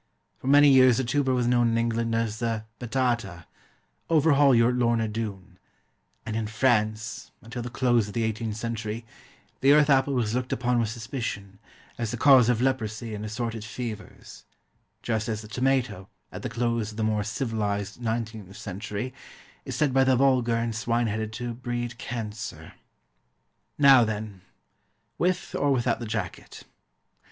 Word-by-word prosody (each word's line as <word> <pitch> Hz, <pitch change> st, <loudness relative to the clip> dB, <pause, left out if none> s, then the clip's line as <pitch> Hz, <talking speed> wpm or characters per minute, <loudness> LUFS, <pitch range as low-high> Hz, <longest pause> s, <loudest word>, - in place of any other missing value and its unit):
For -, -, -8 dB
many 145 Hz, +1 st, +7 dB
years 130 Hz, -3 st, +6 dB
the 130 Hz, -, +1 dB
tuber 135 Hz, +2 st, +1 dB
was 125 Hz, -1 st, +1 dB
known 120 Hz, -1 st, +3 dB
in 115 Hz, -, +1 dB
England 115 Hz, 0 st, 0 dB
as 115 Hz, -1 st, -1 dB
the 115 Hz, -2 st, -2 dB
"Batata" 120 Hz, -8 st, -1 dB, 0.6 s
overhaul 145 Hz, -4 st, +5 dB
your 115 Hz, +1 st, +4 dB
Lorna 120 Hz, -2 st, +1 dB
Doone 105 Hz, -4 st, -6 dB, 0.7 s
and 110 Hz, -1 st, -4 dB
in 110 Hz, -1 st, -1 dB
France, 110 Hz, -2 st, 0 dB
until 115 Hz, +2 st, -6 dB
the 120 Hz, -, -5 dB
close 120 Hz, -3 st, +2 dB
of 105 Hz, -, -9 dB
the 115 Hz, -, +1 dB
eighteenth 110 Hz, -1 st, -2 dB
century, 115 Hz, 0 st, -4 dB, 0.5 s
the 140 Hz, +1 st, +5 dB
earth 150 Hz, -1 st, +5 dB
apple 135 Hz, 0 st, +3 dB
was 115 Hz, -4 st, 0 dB
looked 125 Hz, +1 st, -2 dB
upon 120 Hz, +1 st, +1 dB
with 115 Hz, -2 st, 0 dB
suspicion, 110 Hz, -4 st, -5 dB, 0.4 s
as 115 Hz, -2 st, -1 dB
the 120 Hz, -, -3 dB
cause 130 Hz, -2 st, +6 dB
of 120 Hz, 0 st, +2 dB
leprosy 115 Hz, -3 st, -1 dB
and 105 Hz, 0 st, -5 dB
assorted 110 Hz, +1 st, -4 dB
fevers; 110 Hz, 0 st, -8 dB, 0.6 s
just 115 Hz, 0 st, -1 dB
as 110 Hz, -1 st, -3 dB
the -, -, -10 dB
tomato, 125 Hz, -5 st, -1 dB, 0.2 s
at -, -, -7 dB
the -, -, -4 dB
close 115 Hz, -1 st, -1 dB
of 105 Hz, -, -11 dB
the 110 Hz, -, -1 dB
more 110 Hz, -1 st, +1 dB
civilised 105 Hz, -1 st, -3 dB
nineteenth 110 Hz, -4 st, -4 dB
century, 105 Hz, +4 st, -5 dB, 0.5 s
is -, -, -5 dB
said 145 Hz, -4 st, +1 dB
by 135 Hz, 0 st, +5 dB
the 130 Hz, 0 st, +3 dB
vulgar 125 Hz, -3 st, +3 dB
and 115 Hz, -1 st, -1 dB
swine 120 Hz, +1 st, 0 dB
headed 110 Hz, 0 st, -2 dB
to 120 Hz, +1 st, -4 dB
breed 120 Hz, 0 st, -4 dB
cancer. 110 Hz, -3 st, -6 dB, 1.0 s
Now 135 Hz, -3 st, +7 dB
then, 105 Hz, -3 st, -4 dB, 0.8 s
With 180 Hz, 0 st, 0 dB
or 145 Hz, -, +1 dB
without 120 Hz, -3 st, +1 dB
the 120 Hz, -, -5 dB
jacket? 105 Hz, -5 st, -5 dB
115 Hz, 160 wpm, -26 LUFS, 110-125 Hz, 1.0 s, many